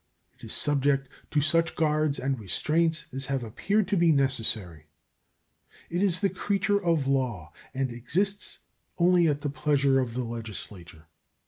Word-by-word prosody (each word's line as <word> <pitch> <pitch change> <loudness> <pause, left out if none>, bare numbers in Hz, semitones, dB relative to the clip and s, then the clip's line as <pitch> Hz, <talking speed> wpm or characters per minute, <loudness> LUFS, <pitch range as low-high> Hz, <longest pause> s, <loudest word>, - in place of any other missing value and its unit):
It - - -25
is - - -5
subjected 140 -2 +1 0.2
to 150 - +1
such 165 +2 +2
guards 155 -2 +1
and 135 -1 -2
restraints 155 - 0
as 135 0 -2
have 135 -3 -1
appeared 200 - 0
to - - +2
be 170 -1 +4
necessary. 110 - 0 1.0
It 175 +2 0
is 185 -2 +2
the 200 - +3
creature 200 +2 0
of 165 -5 +2
law 120 - -1 0.2
and 130 -1 -1
exists 185 - -1 0.4
only 175 -1 +4
at 145 -1 0
the 145 - -2
pleasure 140 -2 +2
of 120 -3 -2
the 125 - -1
Legislature. 105 -8 -8
140 Hz, 150 wpm, -27 LUFS, 120-165 Hz, 1.0 s, be